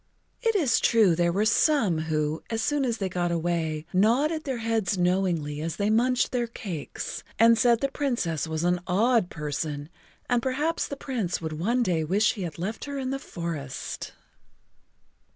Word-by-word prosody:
It 455 Hz, -3 st, +1 dB
is 285 Hz, -, +3 dB
true 220 Hz, -7 st, +4 dB
there 170 Hz, 0 st, +2 dB
were 200 Hz, +5 st, +1 dB
some 225 Hz, -, +3 dB
who, 155 Hz, 0 st, -1 dB
as 225 Hz, 0 st, -1 dB
soon 290 Hz, -2 st, +1 dB
as 235 Hz, -2 st, -1 dB
they 195 Hz, -, -1 dB
got 175 Hz, -1 st, -1 dB
away, 165 Hz, -2 st, -1 dB
nodded 270 Hz, -, +2 dB
their 265 Hz, -3 st, -2 dB
heads 225 Hz, -4 st, 0 dB
knowingly 175 Hz, -5 st, 0 dB
as 165 Hz, 0 st, -3 dB
they 205 Hz, +1 st, 0 dB
munched 245 Hz, +3 st, +2 dB
their 240 Hz, -2 st, 0 dB
cakes, 185 Hz, -9 st, -6 dB
and 230 Hz, +1 st, +6 dB
said 235 Hz, -1 st, +3 dB
the 275 Hz, -, +2 dB
Princess 235 Hz, -, -1 dB
was 160 Hz, 0 st, -2 dB
an 175 Hz, 0 st, +2 dB
odd 220 Hz, +1 st, +3 dB
person 150 Hz, -1 st, -4 dB, 0.4 s
and 245 Hz, -1 st, +2 dB
perhaps 290 Hz, +6 st, -1 dB
the 280 Hz, -, -6 dB
Prince 230 Hz, -11 st, -2 dB
would 160 Hz, -2 st, -4 dB
one 230 Hz, +11 st, +1 dB
day 170 Hz, -7 st, +1 dB
wish 200 Hz, +7 st, +2 dB
he 215 Hz, -, -7 dB
had 170 Hz, -4 st, -5 dB
left 195 Hz, +6 st, -4 dB
her 285 Hz, -1 st, -5 dB
in 260 Hz, -1 st, -2 dB
the 270 Hz, -, -2 dB
forest. 165 Hz, -, -5 dB
200 Hz, 175 wpm, -26 LUFS, 165-245 Hz, 0.4 s, and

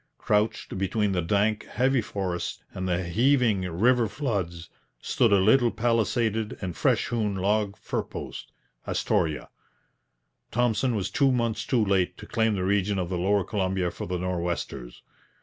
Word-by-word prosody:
Crouched 105 Hz, -2 st, 0 dB
between 100 Hz, +2 st, 0 dB
the 90 Hz, -2 st, 0 dB
dank, 105 Hz, +5 st, +1 dB
heavy 130 Hz, +1 st, +1 dB
forests 95 Hz, -4 st, -4 dB
and 95 Hz, 0 st, -3 dB
the 90 Hz, +1 st, 0 dB
heaving 115 Hz, +3 st, +2 dB
river 115 Hz, +7 st, +3 dB
floods, 100 Hz, -, -3 dB, 0.3 s
stood 115 Hz, -3 st, +1 dB
a -, -, +6 dB
little 115 Hz, +6 st, +4 dB
palisaded 115 Hz, -1 st, 0 dB
and 90 Hz, -4 st, -4 dB
fresh -, -, +1 dB
hewn 110 Hz, -4 st, -1 dB
log 100 Hz, +1 st, 0 dB
fur -, -, -2 dB
post -, -, -8 dB, 0.4 s
Astoria. 75 Hz, -3 st, 0 dB, 1.0 s
Thompson 120 Hz, +1 st, +1 dB
was 100 Hz, -2 st, -2 dB
two 135 Hz, -2 st, +3 dB
months 115 Hz, -2 st, -1 dB
too 120 Hz, -5 st, +2 dB
late 95 Hz, -2 st, +1 dB
to -, -, -10 dB
claim 110 Hz, -2 st, +1 dB
the 95 Hz, -, -2 dB
region 100 Hz, +1 st, +1 dB
of 90 Hz, -2 st, -2 dB
the 90 Hz, -, -2 dB
lower 100 Hz, +2 st, +2 dB
Columbia 95 Hz, -2 st, -1 dB
for -, -, -6 dB
the 90 Hz, 0 st, -2 dB
Nor'westers. 85 Hz, -8 st, -4 dB
100 Hz, 150 wpm, -26 LUFS, 90-115 Hz, 1.0 s, a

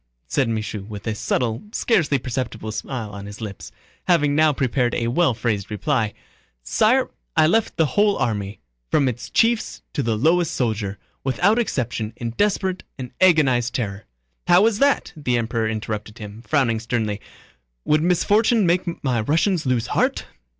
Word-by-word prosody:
said 130 Hz, -, 0 dB
Michaud 110 Hz, -2 st, -3 dB
with 105 Hz, -2 st, -8 dB
a 110 Hz, -, -1 dB
subtle, 115 Hz, +1 st, -1 dB
scarcely 160 Hz, -, +2 dB
perceptible 115 Hz, -4 st, -4 dB
smile 110 Hz, -1 st, -5 dB
on 100 Hz, 0 st, -8 dB
his 105 Hz, +1 st, -9 dB
lips, 105 Hz, -4 st, -7 dB, 0.4 s
having 155 Hz, -5 st, +3 dB
now 155 Hz, +1 st, +4 dB
prepared 130 Hz, -3 st, 0 dB
a 115 Hz, 0 st, 0 dB
well 135 Hz, -1 st, +2 dB
phrased 110 Hz, -3 st, -2 dB
reply, 110 Hz, 0 st, 0 dB, 0.5 s
"sire, -, -, +2 dB, 0.3 s
I -, -, +6 dB
left 220 Hz, +7 st, +1 dB
the 160 Hz, -, +4 dB
whole 205 Hz, +8 st, +2 dB
army, 105 Hz, -4 st, -2 dB, 0.3 s
from 140 Hz, -, +3 dB
its 120 Hz, -1 st, -4 dB
chiefs 230 Hz, 0 st, +1 dB
to -, -, -1 dB
the 115 Hz, -4 st, 0 dB
lowest 165 Hz, +6 st, +2 dB
soldier, 110 Hz, -5 st, -1 dB, 0.3 s
without 180 Hz, -, +2 dB
exception 120 Hz, -, -2 dB
in 115 Hz, -1 st, -4 dB
desperate 190 Hz, -, 0 dB, 0.2 s
and 125 Hz, -2 st, -7 dB
agonized 135 Hz, -10 st, +4 dB
terror..." 105 Hz, -4 st, -3 dB, 0.4 s
"How 180 Hz, +4 st, +6 dB
is 225 Hz, -2 st, +1 dB
that?" 280 Hz, -8 st, +2 dB
the 125 Hz, -6 st, 0 dB
Emperor 115 Hz, -1 st, -1 dB
interrupted 110 Hz, 0 st, -4 dB
him, 105 Hz, +1 st, -9 dB
frowning 125 Hz, -7 st, +2 dB
sternly. 110 Hz, -3 st, -2 dB, 0.6 s
"Would 155 Hz, 0 st, +3 dB
misfortune 205 Hz, +6 st, +3 dB
make 175 Hz, 0 st, 0 dB
my 125 Hz, -5 st, +1 dB
Russians 160 Hz, -, +1 dB
lose 125 Hz, -3 st, +1 dB
heart?... -, -, 0 dB
125 Hz, 155 wpm, -22 LUFS, 110-165 Hz, 0.6 s, I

